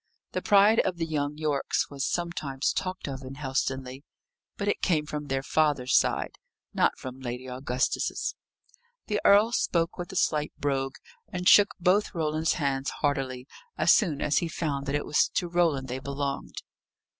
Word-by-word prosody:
The - - -2
pride 205 +2 +5
of 185 -2 +1
the 165 - -1
young 150 -2 -2
Yorkes 150 -3 -1
was 140 -1 -4
sometimes 155 -6 -2
talked 185 -3 -3
of 135 -1 -5
in 130 0 -8
Helstonleigh, 130 -1 -2 0.6
but 200 - -3
it 205 - 0
came 155 -5 +1
from 150 -1 -5
their 135 0 -1
father's 145 -5 +1
side, - - +1 0.3
not - - +2
from 130 0 -8
Lady 125 0 -5
Augusta's. 130 0 -1 0.7
The 210 -2 -1
earl 210 +3 +6
spoke 170 -6 0
with 175 +2 -5
a - - -8
slight 150 -4 +1
brogue, 135 -1 -1 0.4
and 180 -2 -2
shook 205 0 +7
both 185 +3 +2
Roland's 160 0 0
hands 140 -4 -1
heartily, 135 -3 -2 0.3
as - - +5
soon 165 -10 +1
as 145 - +2
he 170 - -2
found 145 -4 -3
that 140 - 0
it 145 - -1
was 150 - +2
to 175 - 0
Roland 165 -6 +1
they 130 +1 -4
belonged. 140 0 -4
145 Hz, 165 wpm, -27 LUFS, 135-175 Hz, 0.7 s, shook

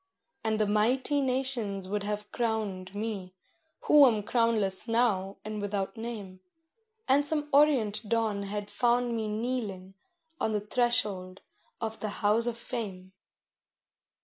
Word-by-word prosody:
And 220 -1 0
the 215 - +3
mighty 250 +7 +2
nations 250 -7 0
would 205 +2 -2
have 210 0 -4
crowned 205 -5 -2
me, 205 -4 -4 0.5
who 295 -2 +7
am 215 -4 +1
crownless 220 -3 +1
now 210 -5 +1
and 215 -1 -4
without 200 -1 -2
name, 215 -5 -7 0.7
And 280 +2 +4
some 295 0 0
orient 235 -8 +3
dawn 225 -3 +1
had 205 +1 -5
found 240 +2 +1
me 220 -1 -2
kneeling 210 -4 -3 0.5
on 220 - 0
the 210 - +1
threshold 205 -5 0 0.4
of 225 -1 -4
the 215 - -3
House 220 +3 +3
of 235 -1 -2
Fame. 195 -6 -5
215 Hz, 130 wpm, -29 LUFS, 200-240 Hz, 0.7 s, who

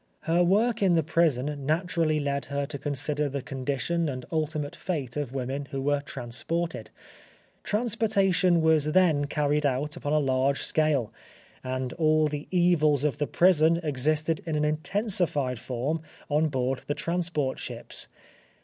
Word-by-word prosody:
Her 170 +2 +2
work 215 +6 +2
in 185 -3 +4
the 165 - +3
prison 150 -3 +1
naturally 165 -1 +1
led 140 -2 -2
her 140 0 -2
to 140 0 -6
consider 145 +1 -1
the 140 -1 -4
condition 140 +5 -2
and 130 -2 -5
ultimate 155 -2 -2
fate 145 -10 -4
of 140 -3 -3
women 135 +2 -3
who 135 0 -5
were 145 +1 +1
transported. 145 +6 -4 0.7
Transportation 200 -6 +2
was 160 -2 +4
then 165 -6 +4
carried 150 +1 0
out 145 +3 0
upon 150 -3 -3
a - - +4
large 135 -1 +1
scale, 150 -7 +2 0.5
and 130 -1 -3
all 155 -1 +3
the 150 -1 -5
evils 165 -6 +3
of 150 -1 0
the 145 - 0
prison 165 -2 +4
existed 155 +2 0
in 160 - -1
an 150 0 +1
intensified 155 - -1
form 130 +7 -2 0.3
on 155 +2 +2
board 130 -2 -1
the 145 - -1
transport 165 -4 -1
ships. - - -6
150 Hz, 150 wpm, -27 LUFS, 140-165 Hz, 0.7 s, in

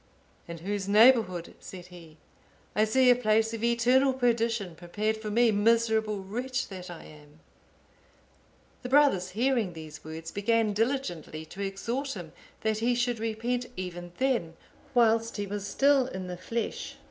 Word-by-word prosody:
"In 170 0 -7
whose 195 +3 -3
neighbourhood," 210 -5 +4
said 180 -2 -10
he, 165 -3 -13 0.6
"I 215 - +4
see 255 +3 +4
a - - +6
place 225 -1 +2
of 225 0 -5
eternal 245 +3 +3
perdition 230 -6 0
prepared 205 +6 -2
for 220 -1 -6
me, 230 +2 +4
miserable 220 -1 +2
wretch 250 +6 -3
that 185 -2 -8
I 170 -2 -9
am." 150 0 -16 1.4
The 250 - -6
brothers, 270 -10 +4
hearing 240 -6 +1
these 155 -1 -10
words, 160 +1 -7
began 215 +1 +1
diligently 200 - -2
to 185 +5 -9
exhort 235 +8 -3
him, 175 -5 -8 0.3
that 220 -1 0
he 240 +2 +1
should 240 -1 0
repent 235 +3 -2
even 175 -1 -6
then, 240 -12 0 0.4
whilst 230 -1 +3
he 205 - -2
was 205 0 -5
still 275 -2 +3
in 190 -7 -6
the 180 0 -5
flesh. 225 +6 -4
220 Hz, 150 wpm, -28 LUFS, 180-240 Hz, 1.4 s, a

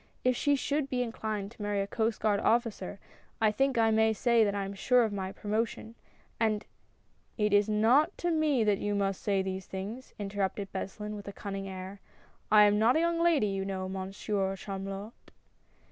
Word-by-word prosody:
If 255 0 +3
she 285 +3 +2
should 280 +1 -1
be 250 -1 0
inclined 215 -3 -4
to 230 - -13
marry 205 -1 -1
a 195 - 0
Coast 220 +2 -1
Guard 210 -2 +2
officer, 220 -4 0 0.4
I 220 -2 +4
think 270 +3 +1
I 225 -1 +4
may 220 0 +3
say 235 +1 +3
that 205 -1 0
I 200 -1 -1
am 195 - -5
sure 245 +5 +3
of 220 -2 -1
my 190 -1 -3
promotion, 220 +2 -3 0.5
and 220 -2 +1 0.2
" - - -39
" - - -39
It 210 - +1
is 205 +1 +4
not 245 - +3
to 350 - -1
me 305 -6 +2
that 210 -2 +2
you 205 0 -1
must 195 -1 -1
say 195 -2 +1
these 190 -1 -4
things," 205 +7 -7
interrupted 200 -1 -3
Beslin, 210 +2 -5
with 205 -1 -9
a - - -4
cunning 195 -1 -5
air; 190 +1 -7 0.5
"I 210 -1 +8
am 205 0 +4
not 230 +3 +4
a - - +4
young 335 0 +1
lady, 330 -9 +4
you 195 -1 -1
know. 190 -1 -3
Monsieur 195 +1 -2
Chamulot." 195 +1 -6
210 Hz, 200 wpm, -30 LUFS, 195-230 Hz, 0.5 s, I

